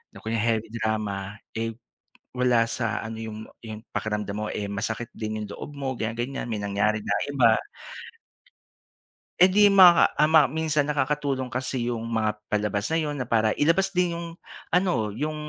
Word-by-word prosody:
na - - -12
kunya 110 0 -1
heavy 110 -1 0
drama, 105 -3 -3 0.2
eh, 115 0 -3 0.6
wala 125 -2 +3
sa 115 -1 -2
ano 110 0 -6
yung 110 -1 -6 0.2
yung 110 0 -9
pakiramdam 105 -2 -2
mo, 105 +1 -3
eh, 105 - -3
masakit 110 +4 -4
din 110 0 -4
yung - - -6
loob 145 0 -9
mo 135 -1 -2
ganyan, 115 -1 -3
ganyan 125 +2 -3
may 110 - -2
nangyari 100 +1 0
na 100 - +1 0.2
iba. 120 -5 +4 1.9
Eh, 185 - +8
di 210 - +6 0.2
maka, 175 -2 +7
ah, 150 - +6
ma 160 - +9
minsan 155 -1 0
nakakatulong 140 -3 -1
kasi 125 -1 -2
yung 115 -1 -4
mga 110 -2 0 0.2
palabas 105 -1 -1
na 160 - -1
'yon 150 -1 -2
na 125 - -3
para 110 -2 +2
ilabas 180 +6 +3
din 180 -2 +1
yung 170 0 -5 0.4
ano, 175 - +1
yung 150 +8 -3
115 Hz, 170 wpm, -25 LUFS, 110-145 Hz, 1.9 s, ma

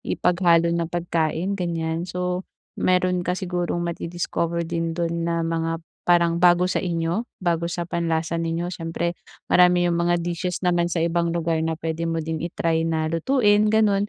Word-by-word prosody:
ipaghalo 170 -2 +2
na 170 -1 -1
pagkain, 170 +1 -1
ganiyan. 165 0 -2
So, 180 0 -2 0.4
meron 180 0 +2
ka 180 +1 -1
sigurong 175 -2 -2
madi-discover 170 0 -2
din 165 0 -2
do'n 170 -1 -1 0.2
na 170 -1 0
mga 165 0 -1 0.3
parang 170 -1 +4
bago 175 0 +5
sa 185 - 0
inyo, 175 +6 -2
bago 170 -2 -1
sa 175 0 -3
panlasa 165 -1 -1
ninyo, 165 +2 -2
siyempre 170 0 -2 0.4
marami 180 0 +5
'yung 170 -1 +1
mga 175 0 +2
dishes 175 +2 -3
naman 175 -1 +2
sa 170 -1 0
ibang 170 0 0
lugar 165 -1 0
na 160 0 -1
puwede 165 +1 -3
mo 165 - -1
din 160 -1 -3
i-try 165 -1 0
na 160 0 -1
lutuin, 210 - +3
gano'n. 210 -2 +3
170 Hz, 160 wpm, -23 LUFS, 165-180 Hz, 0.4 s, bago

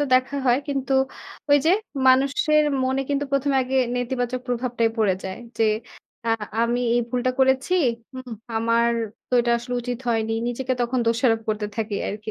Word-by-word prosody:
তো 290 - +3
দেখা 255 +2 +2
হয়। 245 +1 +4
কিন্তু 275 -1 -1 0.6
ওই 285 - +8
যে - - +6 0.4
মানুষের 280 +3 +4 0.2
মনে 265 +1 0
কিন্তু 285 0 0
১মে 275 0 +2
আগে 260 +1 -2 0.2
নেতিবাচক 245 0 -2
প্রভাবটাই 240 -2 0
পড়ে 200 -4 +3
যায়। 190 +2 -5 0.2
যে 225 - +4 0.6
আ - - +2 0.3
আমি 240 +1 +1
এই 240 - +3
ভুলটা 250 0 0
করেছি। 265 +6 +3 0.4
হুম, 255 -1 -8 0.3
আমার 230 +1 +2 0.4
তো - - -29
এটা 240 - 0
আসলে 245 +1 -5
উচিত 245 -1 -3
হয়নি। 225 -1 0 0.2
নিজেকে 255 +2 -2
তখন 245 +1 0
দোষারোপ 230 -1 +2
করতে 215 -1 -1
থাকি 220 -2 -2
আরকি। 210 +1 -5
245 Hz, 165 wpm, -23 LUFS, 230-265 Hz, 0.6 s, ওই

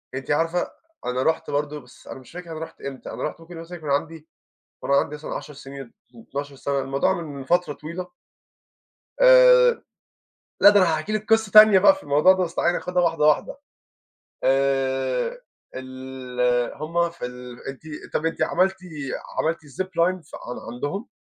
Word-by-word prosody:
أنتِ 135 +2 -4
عارفة 165 +4 0 0.3
أنا 125 +1 -1
رحت 160 0 0
برضو 150 +1 -2
بس - - -19
أنا - - -8
مش 130 - -16
فاكر 175 -1 -9
أنا 160 - -6
رُحت 160 - -9
إمتى، 135 -1 -7
أنا - - -6
رُحت 155 +2 -4
ممكن 165 0 -11
مثلًا 165 +2 -8
يكون 155 -3 -7
عندي 155 +3 -2 0.5
وأنا 140 - +1
عندي 150 - +1
مثلًا 150 - -7
10 150 - -7
سنين، 135 0 -9
اتناشر 120 - -12 0.2
سنة 230 - -14
12 140 0 -5
سنة، 140 +1 -2
الموضوع 135 +7 0
من 140 -4 -7
فترة 175 -2 +1
طويلة. 170 +5 -7 1.1
آآ - - +7 0.8
لا 205 - +9
ده 205 -1 +5
أنا 170 -3 +3
هاحكي 180 +8 -4
لِك 215 +1 -3
قصّة 220 -3 +3
تانية 215 -2 +9
بقى 245 +10 +6
في 290 - -12
الموضوع 150 +6 +5
ده، 185 -1 0
بس 165 - -7
تعالي 175 - +2
ناخدها 180 0 -1
واحدة 165 -3 +1
واحدة. 150 - +2 0.9
آآ 135 - +1 0.4
ال 130 -2 -2
همّ 170 +3 -1
في 170 -7 -6
ال 125 0 -10
أنتِ 135 +1 -8 0.3
طب 160 - 0
أنتِ 165 - -1
عملتِ 190 +1 +2 0.6
عملتِ 165 +1 0
ziplines 180 +3 -1
عن 120 -1 -8
عندهم؟ 195 - -4
155 Hz, 170 wpm, -23 LUFS, 135-180 Hz, 1.1 s, لا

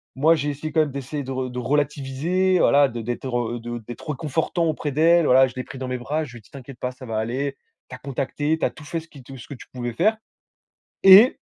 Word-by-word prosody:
Moi, 160 +5 +4
j'ai 150 -1 -2
essayé 150 +2 -5
quand 160 - +4
même 145 -3 -1
d'essayer 140 +2 -5
de 135 - -7
re 130 -1 -3
de 125 - -5
relativiser, 150 +7 0
voilà, 140 0 +5
de 115 0 -6
d'être, 120 +2 -3
heu, 120 0 -3
de 120 +1 -6
d'être 120 +5 -9
réconfortant 160 +3 -1
auprès 150 -2 -2
d'elle. 165 +3 +4
Voilà, 130 0 +6
je 125 - -10
l'ai 130 - -4
pris 135 - -10
dans 130 0 -5
mes 125 0 -2
bras, 150 +5 -2
je 130 - -12
lui 120 - -10
ai - - -19
dit: - - -24
«T'inquiète 135 -2 -11
pas 125 - -3
ça 130 0 -12
va 110 -2 -4
aller, 135 +5 -2 0.3
tu 125 - -7
as - - -13
contacté, 145 +3 -2
tu - - +1
as - - -1
tout 150 - -14
fait 165 +2 -3
ce 165 - -14
qui 140 -4 -14
te 135 +1 -11
ce 115 - -12
que 140 - -8
tu 125 - -12
pouvais 120 -2 -5
faire» 215 - +2 0.9
et 195 +6 +8
140 Hz, 265 wpm, -23 LUFS, 125-155 Hz, 0.9 s, et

